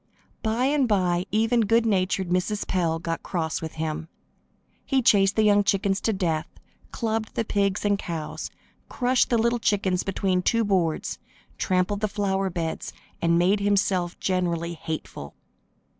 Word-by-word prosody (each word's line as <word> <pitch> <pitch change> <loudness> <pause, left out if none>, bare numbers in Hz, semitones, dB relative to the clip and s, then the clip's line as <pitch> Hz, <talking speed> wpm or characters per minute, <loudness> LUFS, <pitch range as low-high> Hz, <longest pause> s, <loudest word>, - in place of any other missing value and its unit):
By 225 +3 0
and 280 -1 +2
by 180 -4 +1
even 225 +2 +2
good 225 +2 +3
natured 190 -3 +1
Mrs. 185 +4 -1
Pell 170 -3 0
got 165 0 -4
cross 160 -3 -2
with 160 -1 -5
him. 160 0 -3 0.8
He 265 -2 +1
chased 195 -2 +4
the 220 - +3
young 205 -1 +5
chickens 195 -1 +1
to 225 - +1
death, 170 -6 -1 0.4
clubbed 225 -2 -2
the 230 - 0
pigs 200 -1 0
and 205 -1 +2
cows, 165 -5 -5 0.4
crushed 250 0 +1
the 235 - +3
little 235 +1 +1
chickens 195 -4 +1
between 190 -1 0
two 230 +5 +2
boards, 180 -6 0 0.4
trampled 185 +2 +1
the 215 - 0
flower 195 -2 -1
beds 170 -2 -4 0.3
and 170 0 +3
made 185 +4 +3
himself 200 -3 +1
generally 170 -2 -1
hateful. 155 - -6
195 Hz, 150 wpm, -25 LUFS, 175-215 Hz, 0.8 s, young